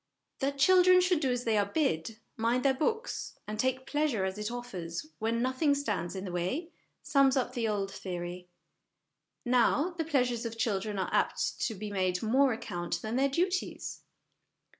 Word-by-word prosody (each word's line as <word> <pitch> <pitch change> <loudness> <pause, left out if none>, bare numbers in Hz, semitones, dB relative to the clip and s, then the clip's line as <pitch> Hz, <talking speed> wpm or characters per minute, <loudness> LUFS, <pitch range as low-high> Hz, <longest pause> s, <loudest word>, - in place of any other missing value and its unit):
That 280 0 -1
children 365 +4 +6
should 360 -2 +3
do 275 -4 0
as 245 0 -1
they 220 -3 +2
are 205 - +2
bid, 215 - -1 0.2
mind 235 +4 0
their 270 - +5
books, 445 - -2
and 210 0 -5
take 260 +1 0
pleasure 290 -10 0
as 190 +2 -3
it 210 +1 -2
offers 195 - -5
when 230 +2 0
nothing 270 +3 +2
stands 205 -11 -2
in 190 +1 -4
the 185 - -5
way, 185 - -2 0.3
sums 275 -1 +4
up 250 -1 0
the 235 -3 -1
old 200 -2 -1
theory; 180 -1 -6 1.0
now, 250 +7 +3
the 345 -2 -3
pleasures 250 -6 +1
of 230 -1 -5
children 210 -2 -1
are 190 - -2
apt - - 0
to 225 - -4
be 205 +1 -6
made 185 -2 +1
of - - -8
more 260 +5 +4
account 175 -7 -3
than 220 +2 -2
their 275 +2 +3
duties. 360 +6 -2
240 Hz, 180 wpm, -30 LUFS, 200-280 Hz, 1.0 s, children